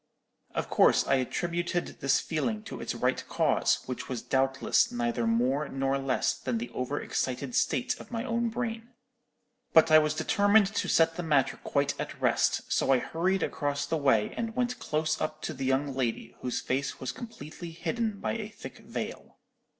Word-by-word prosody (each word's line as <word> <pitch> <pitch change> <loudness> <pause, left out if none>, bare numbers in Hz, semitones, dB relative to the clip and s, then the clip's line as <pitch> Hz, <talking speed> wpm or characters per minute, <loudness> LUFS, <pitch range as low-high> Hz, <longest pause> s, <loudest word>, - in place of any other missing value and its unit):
"Of - - -1
course - - +4
I 135 - +3
attributed 175 +6 -2
this 135 0 +3
feeling 125 -10 -2
to - - -7
its - - -3
right - - 0
cause, - - +2
which 125 - -5
was 125 -3 -4
doubtless 135 0 +2
neither 120 -1 -1
more 130 +6 +1
nor 135 0 0
less 135 -2 +1
than 125 -3 -3
the 120 +2 -5
over 130 +3 -2
excited 130 - -2
state 250 0 +1
of - - -11
my 230 -1 -3
own 235 -2 0
brain. 230 0 -4 0.8
But 160 0 +6
I 155 - +9
was 155 0 0
determined 200 +5 +3
to - - -1
set 165 0 +3
the - - -1
matter 150 -5 +2
quite 140 0 0
at - - -5
rest, - - +2
so - - +1
I 135 - +6
hurried 180 +8 0
across 145 0 -1
the 160 +3 -1
way 135 -8 +2
and 225 -1 -3
went 250 0 -1
close 155 -3 -1
up 155 0 -2
to - - -3
the 135 -1 -4
young 135 +2 +1
lady, 120 -2 -2
whose 125 - -2
face 135 +2 -2
was 130 -1 -3
completely 175 - -8
hidden 200 +6 -2
by - - -1
a 215 -2 -4
thick 215 - -10
veil. - - -6
150 Hz, 180 wpm, -29 LUFS, 130-195 Hz, 0.8 s, I